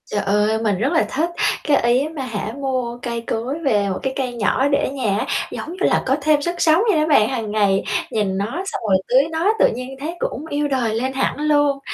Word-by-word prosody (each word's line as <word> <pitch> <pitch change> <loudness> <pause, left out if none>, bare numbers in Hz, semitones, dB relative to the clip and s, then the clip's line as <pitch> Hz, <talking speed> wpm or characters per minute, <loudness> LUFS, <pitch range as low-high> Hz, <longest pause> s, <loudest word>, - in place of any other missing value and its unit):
Trời 205 - -2
ơi, 210 +2 +2
mình 205 -4 +1
rất 260 - 0
là 325 - +3
thích 325 +5 0 0.3
cái, 290 -2 +3
ý 240 +2 +3
á - - -3
mà 285 - -4
hả, 215 -2 -4
mua 255 -3 -2
cây 235 -2 -3
cối 235 +6 -3
về 205 -6 +2
một 185 - -3
cái 265 - -1
cây 260 -3 -2
nhỏ 240 +4 +1
để 280 0 +2
ở - - -1
nhà 235 -8 -1
á, - - -1 0.3
giống - - -6
như - - -9
là - - +2
có 265 - +2
thêm 300 0 +3
sức 345 +4 -2
sống 320 +3 +4
vậy 325 - +2
đó 305 - +1
bạn. 250 -8 +4
Hằng 230 -5 -3
ngày 200 -2 +2 0.3
nhìn 200 -3 0
nó 200 - 0 0.2
xong - - -4
rồi 190 - +5
tưới 265 +4 +4
nó, 335 +7 +2
tự - - +6
nhiên 255 +2 -6
thấy 320 +5 -4
cũng 290 -1 -3
yêu 290 0 0
đời 245 -6 0
lên 260 +4 -1
hẳn 265 - -1
luôn. 290 -2 +2
260 Hz, 250 wpm, -20 LUFS, 220-290 Hz, 0.3 s, tự